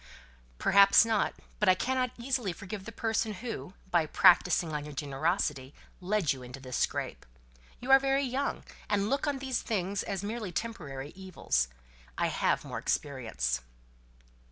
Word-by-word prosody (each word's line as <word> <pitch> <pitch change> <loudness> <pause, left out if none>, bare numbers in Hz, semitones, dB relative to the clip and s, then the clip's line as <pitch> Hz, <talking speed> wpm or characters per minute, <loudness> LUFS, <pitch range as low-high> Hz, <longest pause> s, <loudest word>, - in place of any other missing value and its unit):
"Perhaps 200 - +6
not. 225 -2 +1 0.2
But 210 - +4
I 185 - +6
cannot 255 +4 0
easily 240 -6 -1
forgive 195 +2 -7
the 230 - -7
person 225 -1 -1
who, 215 -3 -6 0.2
by 170 -3 +3
practising 175 0 +4
on 150 -1 -2
your 150 -1 -9
generosity, 145 -1 -1 0.2
led 185 -4 +1
you 130 - -10
into 125 +2 -9
this 130 -2 -6
scrape. - - -1 0.6
You 255 +2 -2
are 270 - +9
very 270 +1 +1
young, 270 +2 -2 0.3
and 205 +2 +1
look 280 +2 0
upon 285 -2 0
these 265 -2 -2
things 200 -2 -1
as 195 0 -4
merely 215 -2 -4
temporary 155 - -5
evils. 185 - -1 0.5
I - - +1
have - - 0
more - - -4
experience." 110 - -1
195 Hz, 155 wpm, -30 LUFS, 150-230 Hz, 0.6 s, are